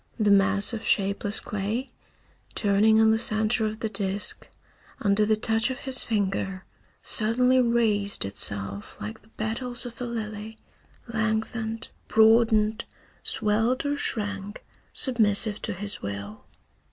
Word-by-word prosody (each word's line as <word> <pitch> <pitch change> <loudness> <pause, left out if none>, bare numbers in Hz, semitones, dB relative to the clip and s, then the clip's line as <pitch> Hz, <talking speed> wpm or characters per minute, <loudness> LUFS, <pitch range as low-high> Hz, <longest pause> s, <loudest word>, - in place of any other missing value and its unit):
The 210 -2 +3
mass 200 +2 +3
of 225 - -5
shapeless 200 +1 -1
clay, 210 +6 -4 0.6
turning 215 +2 +3
on 220 0 +5
the 220 - +1
center 220 +1 +1
of 215 +1 -7
the 225 - -1
disk, 200 -1 +1 0.5
under 205 0 +1
the 215 - +3
touch 225 +1 +1
of 260 0 -6
his 265 -2 +5
finger, 195 -3 -2 0.4
suddenly 250 +4 +3
raised 220 - +1
itself 100 0 -2
like 105 +2 -7
the - - -25
petals 235 +3 -3
of 240 0 -9
a - - -2
lily, 220 -2 -6 0.5
lengthened, 220 0 -3 0.2
broadened, 220 -1 +3 0.4
swelled 225 +6 +2
or 285 0 0
shrank, 205 -6 -3 0.3
submissive 215 -4 +1
to 225 - -3
his 200 +2 -1
will. 100 +1 -7
215 Hz, 130 wpm, -25 LUFS, 200-225 Hz, 0.6 s, on